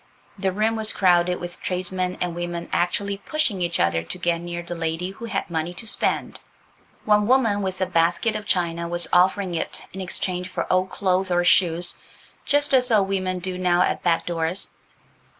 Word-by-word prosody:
The 195 -1 -1
room 215 +4 +1
was 220 0 0
crowded 180 -1 +3
with 175 0 -7
tradesmen 185 0 -2
and 180 -1 -1
women 175 0 -4
actually 200 +3 0
pushing 225 -5 -1
each 175 -1 0
other 85 -1 +2
to 85 - -7
get 175 -2 0
near 175 0 -5
the 175 - -6
lady 165 +2 -2
who 225 +4 -9
had 210 -4 -2
money 170 +1 -3
to 225 - -8
spend. 215 - -1 0.7
One 210 -1 +4
woman 230 -5 +3
with 190 -1 -3
a - - +3
basket 175 +5 +1
of 210 0 -4
china 170 -2 0
was 175 0 0
offering 185 +1 +3
it 165 - -3
in 190 - -5
exchange 180 0 -2
for - - -3
old 185 0 +2
clothes 190 -1 0
or 175 0 +2
shoes, 175 -1 +3 0.5
just 290 -1 +2
as 250 -1 +5
old 205 -4 +3
women 185 -1 -1
do 180 0 -4
now 180 -1 +3
at - - -1
back 170 -2 +1
doors. 170 +2 -2
180 Hz, 185 wpm, -23 LUFS, 175-195 Hz, 0.7 s, as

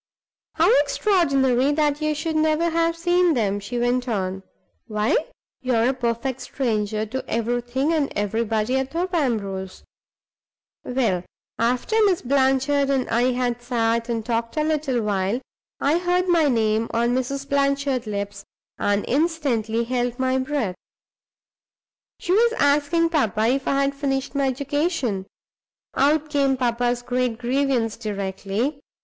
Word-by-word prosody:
"How 330 +2 +4
extraordinary 275 - +2
that 295 0 +1
you 305 0 0
should 320 +1 -3
never 315 +2 +2
have 335 0 +1
seen 350 -1 +2
them!" 205 -4 0
she 220 +5 -5
went 245 +1 0
on. 190 -4 -2 0.5
"Why, 215 -1 +1 0.5
you 255 -1 0
are 230 +2 +3
a - - +1
perfect 245 +1 -2
stranger 215 -4 -1
to 260 +5 -4
everything 245 +6 0
and 300 -3 0
everybody 220 +3 0
at 265 0 -2
Thorpe 355 +5 -3
Ambrose! 200 - -2 1.0
Well, 235 -9 0 0.4
after 245 - 0
Miss 375 -4 +1
Blanchard 270 +1 +2
and 270 -2 +1
I 240 +2 +3
had 245 -1 -1
sat 235 -1 0
and 225 -2 -2
talked 230 +2 -2
a 305 - +2
little 300 -6 0
while, 200 +2 0 0.4
I 300 +5 +2
heard 360 +1 +1
my 335 -4 +4
name 225 -3 +1
on 235 +1 +1
Mrs. 260 +2 -2
Blanchard's 275 -3 0
lips 200 -1 -4 0.4
and 205 0 +1
instantly 260 -7 0
held 245 0 -1
my 260 0 +1
breath. 260 -7 -1 1.4
She - - -4
was 465 +3 +4
asking 300 0 +2
papa 225 - +1
if 270 +2 0
I 275 0 +2
had 275 0 0
finished 275 -1 -2
my 280 -1 +1
education. 275 - -1 0.7
Out 300 +2 +2
came 275 -2 +2
papa's 245 0 0
great 250 -2 -1
grievance 245 -2 0
directly. 205 +5 -3
255 Hz, 140 wpm, -23 LUFS, 230-290 Hz, 1.4 s, How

